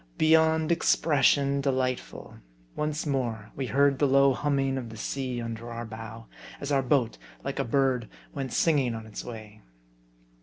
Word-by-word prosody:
Beyond 160 0 +4
expression 140 -4 +3
delightful! 130 -2 -2 0.4
Once 150 +1 -2
more 120 -7 -2
we 135 -2 -3
heard 140 +1 +3
the 145 - +4
low 135 0 +5
humming 135 -1 0
of 120 -3 -7
the 110 - -10
sea 130 +2 -3
under 115 0 -5
our 115 0 -5
bow, 110 0 -9 0.3
as 140 - -4
our 140 -1 +3
boat, 125 - +1 0.2
like - - -4
a - - +2
bird, 130 -1 +1 0.2
went 135 -2 -4
singing 140 -8 +2
on 110 -1 -7
its 110 - -7
way. 110 -3 -10
135 Hz, 155 wpm, -27 LUFS, 115-140 Hz, 0.4 s, low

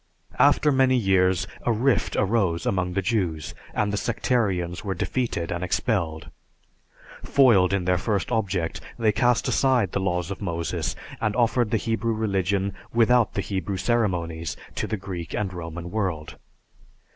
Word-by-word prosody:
After 150 - +5
many 130 -1 +4
years, 95 -3 +2 0.2
a 120 - 0
rift 120 +4 +1
arose 100 -5 +1
among 90 -2 0
the 95 +1 -1
Jews, 90 -7 -1 0.2
and 105 -1 -1
the - - 0
sectarians 100 -8 -1
were 95 -2 -2
defeated 100 -4 -2
and 85 +1 -2
expelled. 85 -4 -1 0.9
Foiled 115 -10 +4
in 100 -2 0
their 90 -1 +2
first 100 +1 -1
object, 100 -7 -1 0.2
they 110 -2 +3
cast 120 +2 +2
aside 125 -8 +2
the - - -1
laws 90 -1 -1
of 100 - -6
Moses 85 -5 -2 0.3
and 105 -1 0
offered 120 -1 +2
the 115 - +2
Hebrew 115 0 -1
religion 100 -2 0 0.2
without 120 0 +3
the 100 - 0
Hebrew 95 0 -3
ceremonies 90 -8 -1 0.2
to - - -2
the 110 - -2
Greek 95 -3 -6
and 100 -3 -2
Roman 85 0 -6
world. 90 -8 -3
100 Hz, 150 wpm, -25 LUFS, 90-115 Hz, 0.9 s, After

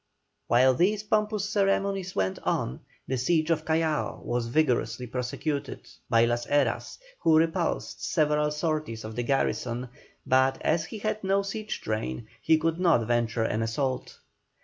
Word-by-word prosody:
While 130 +2 +5
these 200 +9 +1
pompous 210 -1 0
ceremonies 195 -2 0
went 95 -1 0
on, 65 - -1 0.3
the 130 -1 -1
siege 160 +4 +2
of 160 -1 0
Callao 160 -1 0
was 120 -1 -1
vigorously 125 -3 +1
prosecuted 130 +4 -4 0.2
by 115 0 +5
Las 120 0 -1
Heras, 140 -5 0 0.2
who 160 -1 +4
repulsed 165 +2 0
several 150 -1 +2
sorties 150 -6 -2
of 110 0 -7
the 120 - -1
garrison, 125 -1 -1 0.4
but 130 +1 +3
as 160 -1 +1
he 220 - -7
had 215 0 -2
no 195 +1 +2
siege 215 +2 -4
train, 110 - -3 0.2
he 160 0 +4
could 165 +2 -1
not 165 -11 +3
venture 120 0 +1
an 110 0 0
assault. 130 +3 -2
150 Hz, 150 wpm, -27 LUFS, 120-170 Hz, 0.4 s, While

